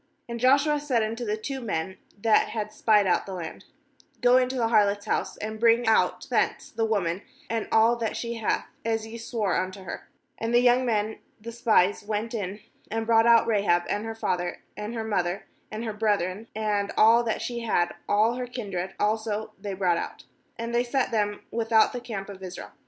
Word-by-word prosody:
^And 235 0 -5
Joshua 280 +4 +4
said 260 -6 +1
unto 225 +3 -3
the 215 -2 -1
two 265 +5 -4
men 190 -4 -3 0.2
that 220 +1 +4
had 215 -1 -4
spied 210 -2 +3
out 185 - +1
the 190 - -5
land: 165 -3 -7 0.5
'Go 245 0 +5
into 255 0 +1
the 230 -3 +1
harlot's 205 -2 +3
house, - - -1
and 215 +1 -5
bring 235 +1 +4
out 220 - +2
thence - - 0
the 225 0 0
woman, 195 -5 0 0.3
and 230 -1 -1
all 225 +2 +5
that 225 -2 -2
she 235 0 -3
hath, 225 - 0 0.2
as 225 -1 -1
ye 225 +1 -9
swore 225 -5 -1
unto 185 +1 -3
her/ 185 - -8 0.3
^And 225 +1 -1
the 240 - +6
young 245 +1 +4
men 215 -1 0 0.2
the 230 +2 -7
spies 220 -5 +2
went 215 +2 -3
in, 205 -1 -4 0.3
and 225 0 -2
brought 225 0 +4
out 235 -1 +6
Rahab, 200 -6 +2
and 205 - -1
her 225 0 -5
father, 180 -5 -2
and 210 +4 -5
her 225 - -2
mother, 190 -4 -1 0.2
and 215 +2 -5
her 220 -2 -3
brethren, 210 -1 -1
and 210 -2 0
all 230 +2 +6
that 225 - -1
she 240 -1 -3
had, 195 -7 +1 0.2
all 215 +3 +3
her 250 -1 -3
kindred 195 -7 -5
also 215 0 -1
they 200 -1 -4
brought 180 -3 +2
out; - - -5 0.3
and 230 +1 -4
they 240 +1 +3
set 250 +1 0
them 205 -2 0
without 225 -1 +3
the 245 - -4
camp 215 -5 -5
of 195 -2 -10
Israel. 185 -1 -8
220 Hz, 200 wpm, -26 LUFS, 205-235 Hz, 0.5 s, the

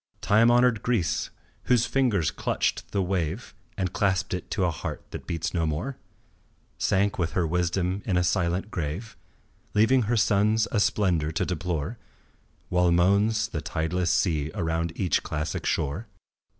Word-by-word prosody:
Time 110 +3 +4
honoured 120 -2 +4
Greece, 115 -9 0 0.4
whose 120 -2 +3
fingers 120 - +1
clutched - - -2
the 100 -2 +1
wave 90 +3 -2 0.2
And 95 -2 -2
clasped 100 -1 0
it 90 - -4
to 95 -5 0
a 85 - +1
heart - - -6
that - - -8
beats 80 -1 -2
no 85 -3 +1
more, 80 - -3 0.8
Sank 100 +1 +1
with 85 -1 -1
her 90 - +1
wisdom 90 +3 0
in 95 -4 0
a 90 - +3
silent 90 +3 0
grave, 85 +7 -4 0.6
Leaving 115 +5 +4
her 120 - +2
sons 105 +2 +3
a 110 - +1
splendour 95 -7 +1
to - - 0
deplore 90 +3 -3 0.7
While 90 -1 +3
moans 100 +5 +3
the 80 -7 -4
tideless 85 +3 -1
sea 80 -5 +1
around 85 -2 -1
each 90 -5 +1
classic 75 0 -3
shore. 80 +8 -1
90 Hz, 150 wpm, -26 LUFS, 85-105 Hz, 0.8 s, Time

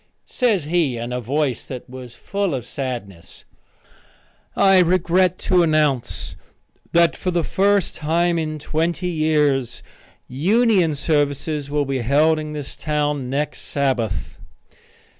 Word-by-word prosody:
Says 225 - +1
he 155 -5 0
in 120 +1 -5
a 125 - -2
voice 135 +1 -1
that 125 -2 -7
was 125 -2 -10
full 200 -6 -2
of 125 -3 -5
sadness: 120 -11 -6 1.1
"I 195 -1 +5
regret 180 +1 +2
to 180 -1 +4
announce 155 -6 0 0.6
that 170 -1 +4
for 185 - -3
the 175 -2 0
first 200 +3 +1
time 170 +2 0
in 155 -1 -3
twenty 165 +4 -2
years 150 -6 0 0.4
union 185 - +2
services 145 0 -1
will 145 0 0
be 135 -2 -2
held 150 +6 +3
in 155 0 -6
this 145 -2 -7
town 150 -3 -2
next 145 +3 -2
Sabbath." 130 -8 -2
150 Hz, 125 wpm, -21 LUFS, 135-170 Hz, 1.1 s, I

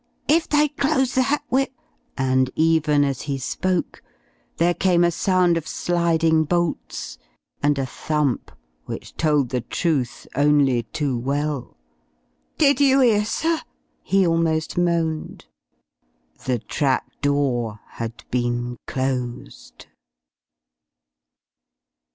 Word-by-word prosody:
"If 320 +2 +3
they 300 0 +4
close 275 -2 0
that, 275 +3 +1
we're 270 +1 +3 0.4
" - - -44
And 130 -1 +2
even 155 -2 +3
as 135 -2 -1
he 140 - 0
spoke 180 +7 -2 0.6
there 175 +1 +3
came 175 -1 +2
a 175 - +3
sound 180 -1 +2
of 160 -1 -5
sliding 165 -2 +2
bolts 170 +1 -2 0.4
and 145 0 +2
a 135 - 0
thump 150 0 -2 0.3
which - - -8
told 150 -5 +2
the 125 0 -1
truth 135 -1 -2
only 145 -3 +3
too 140 +2 -2
well. 140 +1 -2 0.8
"Did 285 -2 +4
you 275 -1 +5
'ear, 210 -4 +3
sir?" 325 +8 0 0.4
he 195 -1 +2
almost 165 -2 +1
moaned. 170 -3 -1 1.0
The 125 -2 +1
trap 130 +4 -1
door 130 -7 0
had 115 0 -7
been 120 0 -1
closed. 125 - -4
155 Hz, 110 wpm, -22 LUFS, 130-175 Hz, 1.0 s, you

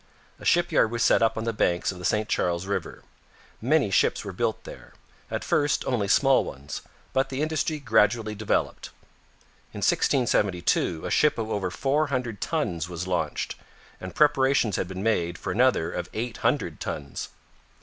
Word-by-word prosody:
A - - -11
shipyard - - +3
was 115 +1 -1
set - - +4
up 115 0 +2
on 110 - -2
the 115 0 -1
banks 90 -4 +1
of 90 - -10
the 90 - -6
St 105 +3 +1
Charles 85 +1 0
river. 100 +1 -4 0.6
Many 135 -3 +2
ships - - +2
were - - -5
built - - -1
there; - - -11 0.4
at - - -3
first 145 -1 +1
only 115 -6 0
small 135 +6 +4
ones, 70 +2 -7 0.3
but 135 0 +1
the 135 +2 -2
industry 155 0 -1
gradually 110 -4 +2
developed. 105 0 -1 0.8
In - - -8
1672 95 - +1
a - - -3
ship 150 - +3
of 110 -1 -3
over 95 -3 -1
four 140 +10 0
hundred 125 -6 -3
tons 85 0 -2
was 90 0 -4
launched, 85 -5 -2 0.5
and 95 - -8
preparations 135 -7 +3
had - - -1
been 95 +1 -6
made 85 -6 0
for 95 - -4
another 120 -6 +2
of 90 0 -4
eight 115 +2 -3
hundred 115 - 0
tons. 70 -2 -5
110 Hz, 170 wpm, -26 LUFS, 90-130 Hz, 0.8 s, set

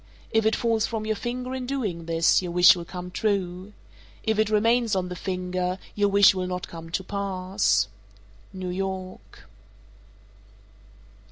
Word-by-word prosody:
If 225 -1 +3
it 220 - +2
falls 230 -2 +1
from 220 -2 -4
your 220 0 0
finger 250 +3 -4
in 255 -1 -4
doing 210 -12 -3
this, 165 +2 +3
your 180 -2 -4
wish 180 +1 +7
will 170 -1 -6
come 180 +1 -7
true. 190 -2 -2 0.5
If 220 -1 0
it 215 -1 +2
remains 225 +1 +2
on 180 -1 -1
the 180 - -5
finger, 180 0 -2 0.2
your 205 -1 +2
wish 200 0 +6
will 185 -1 -3
not 180 0 -4
come 165 -1 -9
to 190 +3 -2
pass. 195 0 0 0.6
_New 185 -1 -5
York. 190 -1 -6
190 Hz, 155 wpm, -25 LUFS, 180-220 Hz, 0.6 s, wish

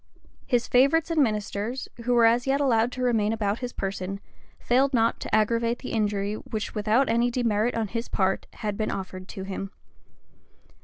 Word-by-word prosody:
His 245 -2 +1
favorites 285 +6 +3
and 320 -2 +3
ministers, 215 +1 -1 0.2
who 245 0 +2
were 235 -1 +6
as 235 +3 +3
yet 275 +1 +2
allowed 240 -4 +2
to 255 - -3
remain 220 -4 +2
about 215 -1 -1
his 245 -1 -4
person, 195 -1 -4 0.4
failed 265 +2 +2
not 230 0 +2
to - - -1
aggravate 230 +2 +1
the - - -7
injury 205 -2 0
which 215 0 -5
without 220 +5 +2
any 235 +1 +2
demerit 235 -2 0
on 225 -2 -1
his 230 +3 -4
part, 190 -1 0
had 210 -2 -4
been 215 - -1
offered 185 -1 -6
to 190 - -7
him. 195 0 -5
225 Hz, 175 wpm, -26 LUFS, 205-245 Hz, 0.4 s, were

